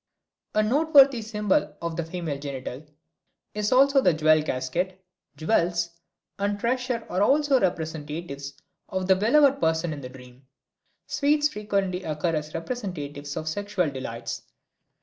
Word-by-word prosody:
A 215 Hz, -, +4 dB
noteworthy 275 Hz, 0 st, +5 dB
symbol 210 Hz, -2 st, 0 dB
of 170 Hz, -1 st, -4 dB
the 170 Hz, -, -2 dB
female 165 Hz, -3 st, -4 dB
genital 135 Hz, -1 st, -6 dB, 0.7 s
is 210 Hz, 0 st, -1 dB
also 275 Hz, +2 st, +5 dB
the 170 Hz, -, +3 dB
jewel 155 Hz, 0 st, +4 dB
casket; 155 Hz, +7 st, -2 dB, 0.4 s
jewels 170 Hz, -1 st, +1 dB, 0.5 s
and 205 Hz, 0 st, -1 dB
treasure 245 Hz, 0 st, -1 dB
are 185 Hz, -, -1 dB
also 280 Hz, +4 st, +4 dB
representatives 155 Hz, -, -3 dB, 0.3 s
of 185 Hz, 0 st, -2 dB
the 190 Hz, 0 st, +5 dB
beloved 275 Hz, +7 st, +4 dB
person 160 Hz, 0 st, +1 dB
in 145 Hz, -, -7 dB
the 125 Hz, -, -7 dB
dream; 125 Hz, 0 st, -15 dB, 0.6 s
sweets 295 Hz, +1 st, +2 dB
frequently 200 Hz, -5 st, -2 dB
occur 160 Hz, 0 st, -2 dB
as 150 Hz, 0 st, -4 dB
representatives 150 Hz, -, -5 dB
of 155 Hz, -, -4 dB
sexual 185 Hz, -2 st, -1 dB
delights. 115 Hz, -3 st, -5 dB
180 Hz, 130 wpm, -26 LUFS, 150-220 Hz, 0.7 s, noteworthy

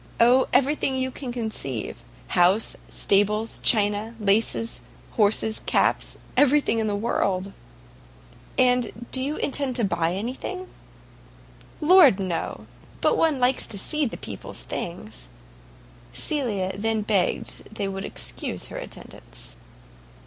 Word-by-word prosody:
"Oh, 245 Hz, +3 st, +5 dB
every 275 Hz, +3 st, +4 dB
thing 270 Hz, -3 st, -1 dB
you 260 Hz, 0 st, -1 dB
can 255 Hz, -1 st, -6 dB
conceive; 215 Hz, -, -4 dB, 0.3 s
house, 185 Hz, +5 st, +3 dB
stables, 210 Hz, +3 st, +1 dB
china, 210 Hz, +1 st, +3 dB
laces, 220 Hz, +2 st, +1 dB, 0.3 s
horses, 220 Hz, 0 st, +2 dB
caps, -, -, 0 dB, 0.2 s
everything 290 Hz, -4 st, +3 dB
in 220 Hz, -, 0 dB
the 205 Hz, -, 0 dB
world." 195 Hz, -3 st, -1 dB, 1.0 s
"And 250 Hz, -2 st, +2 dB
do 260 Hz, -, +4 dB
you 285 Hz, +3 st, -2 dB
intend 275 Hz, -3 st, -1 dB
to 240 Hz, -, -1 dB
buy 170 Hz, -3 st, 0 dB
any 225 Hz, +6 st, -3 dB
thing?" 370 Hz, +7 st, -6 dB, 1.1 s
"Lord, 305 Hz, -, +7 dB
no; 180 Hz, -4 st, -3 dB, 0.3 s
but -, -, +3 dB
one 315 Hz, -4 st, +2 dB
likes 250 Hz, +1 st, +3 dB
to 205 Hz, -, -4 dB
see 300 Hz, +8 st, +2 dB
the -, -, -6 dB
people's -, -, -7 dB
things." 110 Hz, -, -6 dB, 0.9 s
Cecilia 200 Hz, -, -1 dB
then 220 Hz, +2 st, 0 dB
begged 205 Hz, +1 st, -1 dB
they 205 Hz, -2 st, -2 dB
would 195 Hz, 0 st, -4 dB
excuse -, -, -3 dB
her -, -, -7 dB
attendance. -, -, -9 dB
225 Hz, 125 wpm, -24 LUFS, 195-260 Hz, 1.1 s, Lord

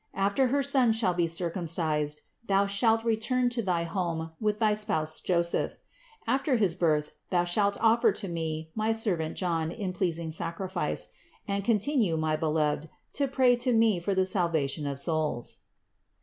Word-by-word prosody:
After 200 Hz, +7 st, +1 dB
her 280 Hz, +3 st, +1 dB
son 260 Hz, -4 st, +4 dB
shall 220 Hz, -5 st, +1 dB
be 175 Hz, -1 st, +1 dB
circumcised, 165 Hz, -3 st, 0 dB, 0.3 s
thou 195 Hz, 0 st, +3 dB
shalt 225 Hz, +3 st, +2 dB
return 235 Hz, +2 st, +1 dB
to 240 Hz, -1 st, -1 dB
thy 180 Hz, -5 st, 0 dB
home 165 Hz, -2 st, -3 dB
with 210 Hz, -1 st, 0 dB
thy 215 Hz, -1 st, +2 dB
spouse 155 Hz, -7 st, +2 dB
Joseph. 170 Hz, -1 st, 0 dB, 0.5 s
After 270 Hz, 0 st, +1 dB
his 200 Hz, -7 st, +2 dB
birth 155 Hz, -4 st, 0 dB, 0.2 s
thou 175 Hz, -2 st, +2 dB
shalt 200 Hz, +3 st, +1 dB
offer 230 Hz, +1 st, +4 dB
to 200 Hz, -, -3 dB
Me 160 Hz, -2 st, -4 dB
my 220 Hz, +1 st, 0 dB
servant 185 Hz, -8 st, -1 dB
John 165 Hz, -3 st, -1 dB
in 185 Hz, +1 st, -4 dB
pleasing 170 Hz, -3 st, -2 dB
sacrifice; 175 Hz, +3 st, -2 dB, 0.4 s
and 200 Hz, 0 st, -2 dB
continue, 215 Hz, -, +1 dB
my 155 Hz, 0 st, 0 dB
Beloved, 155 Hz, -1 st, -1 dB, 0.2 s
to 280 Hz, 0 st, 0 dB
pray 260 Hz, -2 st, +3 dB
to 245 Hz, +1 st, 0 dB
Me 225 Hz, -4 st, +3 dB
for 195 Hz, +3 st, -2 dB
the 190 Hz, 0 st, +2 dB
salvation 160 Hz, -6 st, 0 dB
of 140 Hz, -1 st, -3 dB
souls." 150 Hz, -5 st, -1 dB
185 Hz, 160 wpm, -28 LUFS, 160-220 Hz, 0.5 s, son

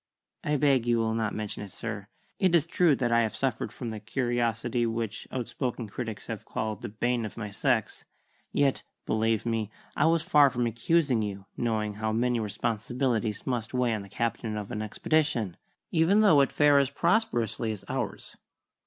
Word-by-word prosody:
"I 150 Hz, -, +1 dB
beg 135 Hz, -4 st, +3 dB
you 120 Hz, -1 st, +3 dB
will 110 Hz, -1 st, +1 dB
not 110 Hz, -2 st, -1 dB
mention 105 Hz, -1 st, -4 dB
it, 100 Hz, -2 st, -7 dB
sir. 105 Hz, -2 st, -5 dB, 0.3 s
It 185 Hz, -3 st, +4 dB
is 160 Hz, -3 st, +4 dB
true 170 Hz, -2 st, +3 dB
that 125 Hz, -2 st, 0 dB
I 115 Hz, -1 st, +4 dB
suffered 115 Hz, -1 st, -2 dB
from 115 Hz, +2 st, -5 dB
the 110 Hz, -, -5 dB
curiosity 120 Hz, 0 st, 0 dB
which 115 Hz, -2 st, -3 dB
outspoken 125 Hz, -1 st, -3 dB
critics 110 Hz, +1 st, -5 dB
have -, -, -5 dB
called 110 Hz, -2 st, -3 dB
the -, -, -5 dB
bane 120 Hz, +3 st, 0 dB
of 110 Hz, -, -6 dB
my 105 Hz, -3 st, -5 dB
sex; 100 Hz, -, 0 dB, 0.5 s
yet, 140 Hz, -2 st, +2 dB, 0.2 s
believe 110 Hz, 0 st, +1 dB
me, 115 Hz, -3 st, -1 dB, 0.3 s
I -, -, +3 dB
was 165 Hz, -1 st, +3 dB
far 145 Hz, -3 st, +6 dB
from 120 Hz, -1 st, -1 dB
accusing 125 Hz, +2 st, +2 dB
you, 100 Hz, -2 st, -4 dB
knowing 110 Hz, -3 st, -1 dB
how 110 Hz, 0 st, 0 dB
many 120 Hz, +1 st, +1 dB
responsibilities 115 Hz, +2 st, -1 dB
must 120 Hz, -2 st, -2 dB
weigh 125 Hz, -2 st, +2 dB
on 110 Hz, -, -2 dB
the 100 Hz, -, -11 dB
captain 115 Hz, 0 st, -2 dB
of 105 Hz, -1 st, -5 dB
an 105 Hz, -, -3 dB
expedition, 115 Hz, -, 0 dB, 0.4 s
even 175 Hz, +6 st, +4 dB
though 185 Hz, -10 st, +6 dB
it 135 Hz, -, +2 dB
fare 145 Hz, -1 st, +5 dB
as 140 Hz, -2 st, +2 dB
prosperously 120 Hz, -, +1 dB
as 100 Hz, -3 st, -7 dB
ours." -, -, -4 dB
115 Hz, 180 wpm, -28 LUFS, 110-135 Hz, 0.5 s, far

